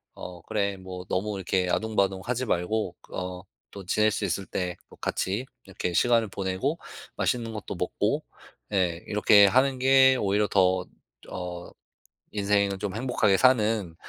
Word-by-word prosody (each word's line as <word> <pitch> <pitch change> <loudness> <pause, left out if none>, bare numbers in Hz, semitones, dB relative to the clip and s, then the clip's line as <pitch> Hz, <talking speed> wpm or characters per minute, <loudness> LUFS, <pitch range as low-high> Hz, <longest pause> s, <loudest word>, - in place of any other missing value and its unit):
어 90 -1 -9
'그래 100 -2 -1
뭐 95 -1 -8
너무 100 +2 -1
이렇게 90 -1 0
아등바등하지 110 +3 0
말고 95 +1 -1
그 - - -12
어 90 0 -5 0.3
또 100 - -7
지낼 110 +2 +3
수 - - -3
있을 100 - -2
때 90 -1 -3
뭐 - - -17
같이 100 +7 -2 0.2
이렇게 90 -2 -4
시간을 115 +2 +3
보내고 100 - -2 0.4
맛있는 115 -2 -1
것도 105 - -6
먹고 - - -1 0.5
예 90 -3 0
이렇게 105 -1 +6
하는 130 +4 +2
게 130 0 +6
오히려 105 -1 +1
더 95 -1 +2 0.4
어 90 -1 -6 0.6
인생을 100 -1 +1
좀 100 0 -4
행복하게 110 -5 +2
사는 110 -8 +3
100 Hz, 285 characters per minute, -26 LUFS, 95-110 Hz, 0.6 s, 이렇게